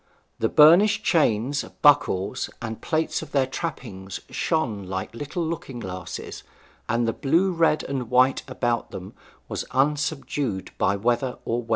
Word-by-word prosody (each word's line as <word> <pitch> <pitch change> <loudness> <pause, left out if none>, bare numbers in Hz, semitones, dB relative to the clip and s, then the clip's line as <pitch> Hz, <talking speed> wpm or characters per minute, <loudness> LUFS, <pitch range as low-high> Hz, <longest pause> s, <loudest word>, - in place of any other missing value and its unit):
The 115 - +1
burnished 195 +8 +6
chains, 140 - +2 0.2
buckles, 130 -10 +3
and 115 -2 -6
plates 160 0 -1
of - - -10
their 135 -2 +3
trappings 115 - -6
shone 130 - -1
like 95 +2 -4
little 145 +7 -4
looking 160 -6 -5
glasses, 95 -4 -7 0.5
and 115 +1 +1
the 115 - +1
blue, 170 +7 +2
red, 165 -3 +2
and 130 -4 -4
white 130 +2 +4
about 120 -2 -1
them 95 +1 -8 0.3
was - - -3
unsubdued 140 -5 -1
by 100 - +2
weather 120 +4 0
or 120 +1 -1
wear. 115 - -16
130 Hz, 145 wpm, -24 LUFS, 110-150 Hz, 0.5 s, burnished